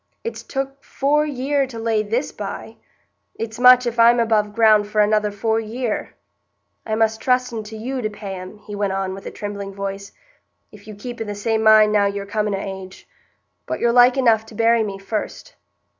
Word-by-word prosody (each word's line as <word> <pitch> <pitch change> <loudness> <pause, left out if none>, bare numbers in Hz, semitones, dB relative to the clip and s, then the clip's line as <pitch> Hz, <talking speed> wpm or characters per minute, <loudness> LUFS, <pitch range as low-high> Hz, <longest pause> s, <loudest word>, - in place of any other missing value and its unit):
It's 465 - -5
took 270 0 -5
four 295 +2 +1
year 275 0 0
to 245 -3 -9
lay 225 -1 0
this 225 +6 -2
by; - - -7 0.6
it's 225 0 -6
much 250 0 +7
if 240 0 -3
I'm 235 +1 +6
above 215 -2 +1
ground 215 -1 +4
for 210 +1 -2
another 210 0 +3
four 220 +2 -1
year. 225 +1 -4 0.7
I 215 - 0
must 220 0 +1
trusten 250 -3 0
to 220 +1 -9
you 255 +4 -4
to 215 - -2
pay 205 -2 -7
'em," 185 +2 -9
he 210 0 -11
went 200 -1 -1
on, 190 -1 -2
with 195 - -9
a - - -3
trembling 200 -1 -6
voice, 200 0 -5 0.6
"if 210 0 -16
you 215 - -9
keep 240 +3 -8
i' - - 0
the 205 -1 -6
same 220 +2 -1
mind 215 -1 +6
now 205 -1 +3
you're 200 0 -4
coming 210 0 -1
o' - - -3 0.2
age. 185 0 -14 0.6
But - - -3
you're 235 - +2
like 245 +2 +6
enough 230 -4 +3
to 220 - -13
bury 230 +1 +3
me 200 -3 -3
first." 215 - -5
220 Hz, 200 wpm, -21 LUFS, 205-240 Hz, 0.7 s, much